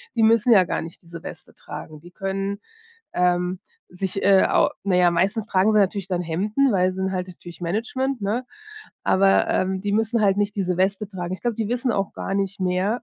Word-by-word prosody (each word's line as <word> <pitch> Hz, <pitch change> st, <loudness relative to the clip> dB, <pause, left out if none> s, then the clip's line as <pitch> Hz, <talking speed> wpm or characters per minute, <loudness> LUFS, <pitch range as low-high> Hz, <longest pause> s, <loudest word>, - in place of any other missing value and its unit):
die 225 Hz, -, +2 dB
müssen 230 Hz, +2 st, +4 dB
ja 200 Hz, -5 st, +7 dB
gar 175 Hz, -, -2 dB
nicht 165 Hz, 0 st, -9 dB
diese 165 Hz, -1 st, -10 dB
Weste -, -, -10 dB
tragen. 155 Hz, -1 st, -9 dB
Die 175 Hz, -, -13 dB
können, 195 Hz, +2 st, -3 dB, 0.5 s
ähm, 180 Hz, 0 st, +1 dB, 0.3 s
sich, 190 Hz, +1 st, -3 dB
äh, 195 Hz, -1 st, +6 dB
au -, -, +3 dB
na 195 Hz, -2 st, +1 dB
ja, 180 Hz, -1 st, +5 dB
meistens 195 Hz, +6 st, 0 dB
tragen 200 Hz, 0 st, +2 dB
sie 215 Hz, -, +3 dB
natürlich 195 Hz, -1 st, 0 dB
dann 180 Hz, -2 st, -1 dB
Hemden, 210 Hz, +11 st, +1 dB
weil 185 Hz, -2 st, +2 dB
sie -, -, -9 dB
sind 190 Hz, 0 st, -2 dB
halt 185 Hz, -1 st, -3 dB
natürlich 175 Hz, -1 st, -12 dB
Management, 235 Hz, +9 st, -2 dB
ne? 215 Hz, +5 st, -2 dB, 0.6 s
Aber, 195 Hz, 0 st, +4 dB
ähm, 190 Hz, 0 st, 0 dB
die 205 Hz, 0 st, -1 dB
müssen 220 Hz, +1 st, +1 dB
halt 200 Hz, -1 st, +3 dB
nicht 205 Hz, 0 st, -1 dB
diese 180 Hz, -2 st, 0 dB
Weste 195 Hz, +2 st, +1 dB
tragen. 185 Hz, -2 st, -5 dB
Ich -, -, -11 dB
glaube, 240 Hz, -1 st, 0 dB
die 220 Hz, -1 st, -2 dB
wissen 245 Hz, 0 st, 0 dB
auch 195 Hz, -1 st, -2 dB
gar -, -, -4 dB
nicht 195 Hz, 0 st, -1 dB
mehr, 185 Hz, +6 st, 0 dB
195 Hz, 210 wpm, -23 LUFS, 180-210 Hz, 0.6 s, ja